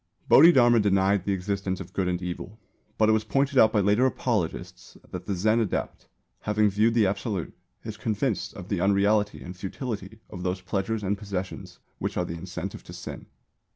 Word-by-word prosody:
Bodhidharma 120 -8 +7
denied 100 -1 +2
the 100 - 0
existence 95 0 -2
of 95 -1 -9
Good 95 -2 0
and 90 -1 -1
Evil; 90 +3 -6 0.4
but 110 - +4
it - - +5
was 110 0 +2
pointed 135 +5 +1
out 110 - +6
by 105 -2 +2
later 105 +6 +3
apologists 110 -10 -3
that - - -7
the 100 - -1
Zen 110 +5 +2
adept, 110 -5 -3 0.3
having 105 -1 +1
viewed 110 +4 +2
the 115 -3 +4
Absolute, 100 -2 -2 0.3
is 110 -1 -6
convinced 110 +1 -2
of 95 -1 -9
the 100 -4 -1
unreality 100 +2 +2
and 90 +1 -8
futility 105 +2 -6
of 90 -4 -7
those 90 +1 -2
pleasures 100 +3 -2
and 100 +1 -1
possessions 95 -2 -5 0.2
which - - -3
are 90 - +1
the 85 - -5
incentive 90 +2 -6
to - - -10
sin. - - -8
100 Hz, 185 wpm, -26 LUFS, 95-110 Hz, 0.4 s, Bodhidharma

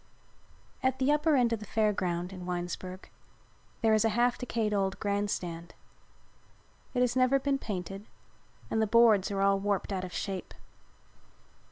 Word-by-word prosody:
At 260 0 +1
the 265 +2 +2
upper 300 +1 +3
end 240 -3 +3
of 225 - -2
the 210 - -8
Fair 215 -1 +2
Ground, 180 -1 -2
in 180 -1 -8
Winesburg, 180 +1 -5 0.7
there 225 -1 +4
is 215 - +4
a 225 - +3
half 240 +3 +2
decayed 225 -3 -2
old 195 -1 0
grand 205 0 -1
stand. 170 -3 -5 1.2
It 250 - +2
has 250 -1 +2
never 255 +1 +4
been 275 0 0
painted 195 -1 -5 0.6
and 220 - +1
the 220 - +2
boards 220 -3 +5
are 195 -1 -1
all 195 0 +3
warped 200 0 -1
out 185 -1 -2
of 185 - -6
shape. 190 +1 -5
205 Hz, 165 wpm, -30 LUFS, 190-240 Hz, 1.2 s, boards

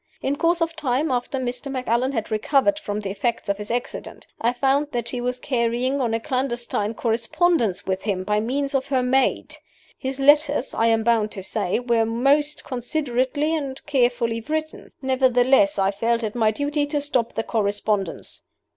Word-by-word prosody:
In 275 - 0
course 335 +3 +1
of 330 0 -3
time 285 -1 0
after 245 +2 -1
Mr. 250 +1 -3
Macallan 255 0 0
had 225 -3 -3
recovered 275 +7 +2
from 210 -8 -4
the 195 -2 -4
effects 215 +2 -2
of 200 0 0
his 210 - -6
accident 245 +1 -4 0.2
I 235 - +3
found 270 +4 +1
that 235 -1 -2
she 245 - -4
was 250 +1 -2
carrying 250 +1 0
on 230 -3 0
a - - 0
clandestine 240 -4 -2
correspondence 235 - +1
with 190 0 -1
him 195 -3 -2
by 210 +2 +1
means 275 +6 -1
of 270 0 0
her 265 -2 +1
maid. 260 +2 +1 0.4
His 265 +1 -3
letters, 290 -1 +4
I 225 - +2
am 225 -1 +2
bound 225 -2 +2
to 195 - -6
say, 200 -1 -1
were 235 -2 +2
most 280 +6 +2
considerately 265 +3 -1
and 275 -4 -4
carefully 240 -5 +1
written. 310 +5 -4
Nevertheless, 260 +2 +3
I 195 0 +2
felt 230 +3 0
it 215 -1 -2
my 225 -3 +2
duty 290 +5 -1
to 295 0 -1
stop 260 -5 0
the 225 - -2
correspondence. 205 -4 -1
245 Hz, 175 wpm, -23 LUFS, 225-280 Hz, 0.4 s, letters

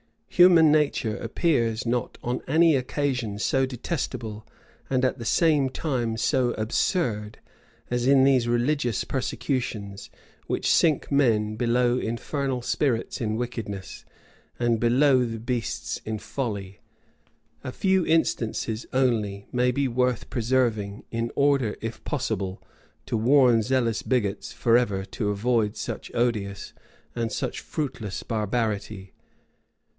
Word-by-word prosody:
Human 175 -4 +6
nature 140 -7 +1
appears 115 -9 0
not 120 +1 -1
on 120 +1 -2
any 160 +2 +4
occasion 125 -5 -1
so 130 +6 +1
detestable, 115 -5 -4 0.4
and 130 -1 +2
at 130 - -1
the 115 - -6
same 150 0 +3
time 125 -6 -2
so 125 +1 +1
absurd, 110 - -1 0.5
as 125 0 0
in 135 -1 +6
these 130 -3 +4
religious 120 0 +1
persecutions, 120 -6 -3 0.4
which - - 0
sink 155 -4 +2
men 110 -6 +2
below 120 +2 +2
infernal 125 +2 -2
spirits 125 -3 -1
in 110 -1 -1
wickedness, 110 -5 -5 0.5
and 120 -2 +1
below 130 +3 +4
the 115 -2 -3
beasts 115 -1 -3
in 110 0 -3
folly. 100 -5 -5 0.8
A 130 - -4
few 190 +5 +2
instances 115 -8 0
only 110 -6 0
may 125 0 +2
be 135 +2 0
worth 125 -1 -1
preserving, 115 -4 0
in 115 0 -2
order, 140 -6 +2
if 115 0 -6
possible, 100 -9 -3 0.4
to - - -2
warn 120 0 +5
zealous 120 -1 0
bigots 110 -7 -1
forever 115 -5 +2
to 105 +1 -3
avoid 105 +1 +1
such - - -5
odious 105 -5 -1 0.4
and 115 -2 -2
such 130 -3 -3
fruitless 125 - -4
barbarity. 105 -3 -2
120 Hz, 120 wpm, -25 LUFS, 110-130 Hz, 0.8 s, Human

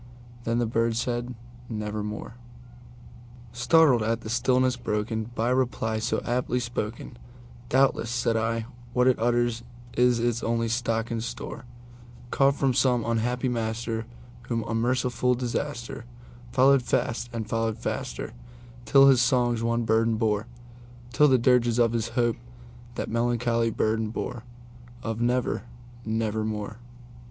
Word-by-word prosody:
Then 115 +1 0
the 120 - +2
bird 115 0 0
said, 120 +1 -2 0.3
"Nevermore."Startled 120 +4 -2
at 115 +1 0
the 110 - -6
stillness 125 +1 +2
broken 110 -1 -2
by 115 +2 +1
reply 120 -4 0
so 115 - -1
aptly 125 0 0
spoken,"Doubtless," 120 +2 -2
said 115 -1 0
I, 115 0 0 0.3
"what 125 0 +3
it 130 -1 +3
utters 120 0 +1 0.3
is 125 -1 +4
its 120 0 0
only 115 0 0
stock 115 -1 -1
and 115 -1 -2
store, 120 +1 -6 0.7
Caught 135 0 +3
from 135 -2 +1
some 125 -2 +2
unhappy 120 +3 0
master 115 -1 -2 0.4
whom 115 -2 -1
unmerciful 125 +2 +1
DisasterFollowed 120 0 -1
fast 120 0 -1
and 115 -2 -4
followed 115 0 -1
faster - - -4 0.5
till 135 +5 +7
his 130 -3 +6
songs 120 -1 +2
one 115 0 0
burden 115 0 +2
bore:Till 120 +4 -1
the 130 -2 +5
dirges 120 -1 +3
of 115 -1 +3
his 115 -1 0
Hope 120 -2 +2 0.6
that - - -3
melancholy 115 0 +1
burden 110 0 0
boreOf 120 -1 -7
'Never—nevermore. 115 -3 -2
120 Hz, 115 wpm, -26 LUFS, 115-120 Hz, 0.7 s, till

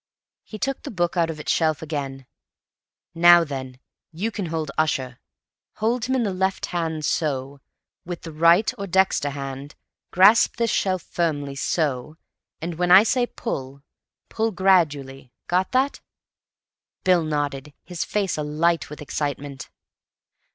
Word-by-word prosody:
He 215 - -9
took 270 +5 -2
the - - -7
book 175 -4 -1
out 170 -2 +2
of 155 -1 -5
its 155 - -1
shelf 160 -2 +1
again. 140 -4 -5 0.9
"Now 175 0 +7
then, 130 -4 -6 0.3
you 195 +8 -3
can 200 -5 -4
hold 160 -3 -3
Ussher. 130 -6 -1 0.6
Hold 230 +2 0
him 260 - 0
in 250 - +1
the 200 -3 -1
left 190 +1 -1
hand—so. 150 -5 -2 0.4
With 175 -1 -7
the 165 - -7
right 170 +6 +4
or 200 - -4
dexter 190 -5 +2
hand, 140 0 -7 0.3
grasp 205 +5 +5
this 230 -1 0
shelf 185 -3 0
firmly—so. 145 -2 -2 0.5
Now, 170 0 -3
when 180 0 0
I 190 +3 +9
say 245 +2 +1
'Pull,' 140 - -6 0.4
pull 225 0 -1
gradually. 150 - +1
Got 180 +1 0
that?" 265 +2 +1 1.0
Bill 180 -2 +4
nodded, 145 -2 -3
his 175 -2 -4
face 195 -6 -1
alight 155 +3 0
with 150 0 -8
excitement. 140 -3 -4
165 Hz, 135 wpm, -23 LUFS, 145-185 Hz, 1.0 s, I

